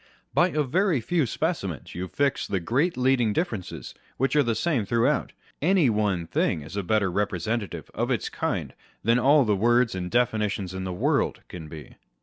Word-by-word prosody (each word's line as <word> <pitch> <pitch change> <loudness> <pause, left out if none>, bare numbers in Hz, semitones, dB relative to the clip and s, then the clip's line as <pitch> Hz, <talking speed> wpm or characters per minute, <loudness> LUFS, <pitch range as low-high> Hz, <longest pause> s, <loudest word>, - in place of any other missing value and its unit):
By 175 - +4
a 150 -3 0
vory 170 +3 +1
few 150 +4 0
specimens 110 - -3
you 90 +1 -4
fix 140 +6 0
the 95 - -1
great 135 - 0
leading 125 -4 +2
differences 110 - -3 0.2
which 135 +3 +1
are 150 - +6
the 120 -4 0
same 135 -1 0
throughout. 115 +3 +1 0.3
Any 170 -5 +4
one 100 -5 0
thing 80 -1 0
is 80 +6 -9
a 100 - 0
better 100 0 +1
representative 105 +2 -2
of - - -1
its - - 0
kind - - -3 0.3
than 115 +4 +3
all 140 +2 +5
the 105 -2 +2
words 120 +4 +3
and 90 -1 -4
definitions 105 -5 0
in 95 0 -4
the 95 - -3
world 90 - 0
can 80 -3 -8
be. 75 -1 -11
115 Hz, 180 wpm, -26 LUFS, 95-135 Hz, 0.3 s, are